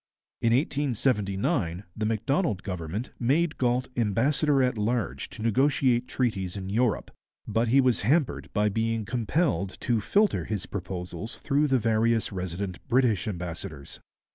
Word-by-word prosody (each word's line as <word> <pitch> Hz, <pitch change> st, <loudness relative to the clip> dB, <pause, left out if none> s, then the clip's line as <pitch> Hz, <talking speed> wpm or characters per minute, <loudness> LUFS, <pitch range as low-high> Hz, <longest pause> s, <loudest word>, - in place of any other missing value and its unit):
In 115 Hz, -, +3 dB
1879 105 Hz, -, 0 dB
the 105 Hz, -1 st, -1 dB
Macdonald 115 Hz, -, 0 dB
Government 90 Hz, +4 st, -4 dB
made 150 Hz, +7 st, +1 dB
Galt 125 Hz, 0 st, +1 dB
ambassador 135 Hz, +6 st, +2 dB
at 125 Hz, 0 st, +1 dB
large 105 Hz, -, -1 dB
to 110 Hz, -, -8 dB
negotiate 125 Hz, +1 st, +2 dB
treaties 100 Hz, -8 st, -1 dB
in 95 Hz, -1 st, -5 dB
Europe, 115 Hz, -1 st, +1 dB, 0.4 s
but 115 Hz, +2 st, +1 dB
he 130 Hz, +4 st, +5 dB
was 130 Hz, -4 st, +3 dB
hampered 140 Hz, +6 st, +1 dB
by 105 Hz, 0 st, +2 dB
being 110 Hz, +1 st, 0 dB
compelled 115 Hz, -, 0 dB
to 115 Hz, -3 st, +1 dB
'filter' 205 Hz, -, +2 dB
his 105 Hz, -4 st, -3 dB
proposals 90 Hz, +1 st, -5 dB
through 145 Hz, +1 st, +1 dB
the 135 Hz, -2 st, +3 dB
various 115 Hz, 0 st, +1 dB
resident 95 Hz, 0 st, -4 dB
British 120 Hz, -7 st, +2 dB
ambassadors. 85 Hz, -6 st, -6 dB
115 Hz, 135 wpm, -27 LUFS, 100-130 Hz, 0.4 s, he